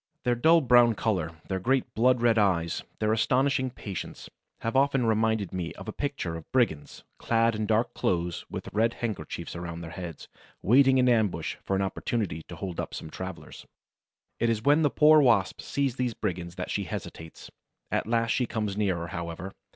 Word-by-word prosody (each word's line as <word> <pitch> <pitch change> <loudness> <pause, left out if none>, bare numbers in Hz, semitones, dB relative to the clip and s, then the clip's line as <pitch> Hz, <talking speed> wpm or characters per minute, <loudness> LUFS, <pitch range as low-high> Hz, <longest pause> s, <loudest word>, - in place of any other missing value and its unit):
Their 125 - +2
dull 160 +8 +5
brown 120 -3 +5
color, 95 -7 -1 0.2
their 95 -1 -2
great 130 +6 0
blood 125 +1 +3
red 115 -2 +4
eyes, 85 -5 +1 0.2
their 110 0 +1
astonishing 130 +3 +2
patience, 100 -6 -7 0.3
have 115 +2 -2
often 135 -2 +3
reminded 110 -3 +1
me 90 -2 -3
of 95 - -11
a - - -3
picture 140 - -3
of 80 - -10
brigands, 80 - 0 0.2
clad 115 0 +2
in 110 -1 -2
dark 115 +2 +1
clothes, 85 -1 -1
with - - -7
red 115 +3 +2
handkerchiefs 90 -7 -5
around 85 -1 -6
their 80 -2 -8
heads, 85 -3 -8 0.4
waiting 130 +4 +5
in 125 -1 +4
ambush 105 -9 +1
for 95 - -1
an 95 - +1
opportunity 95 -3 -2
to 85 - -8
hold 90 0 -6
up - - -4
some 80 - -7
travelers. 95 0 -8 0.7
It 115 - +2
is 110 -1 -1
when 145 +4 +4
the 145 - +3
poor 155 +1 +6
Wasp 115 -8 +2
sees 135 -3 -1
these 125 -3 -1
brigands 85 -5 -4
that - - -5
she - - -1
hesitates. 80 -1 -8 0.4
At - - 0
last 115 0 +1
she 125 -3 +1
comes 105 -4 -2
nearer, 90 -5 -1
however. 85 +2 -6
110 Hz, 180 wpm, -27 LUFS, 90-125 Hz, 0.7 s, poor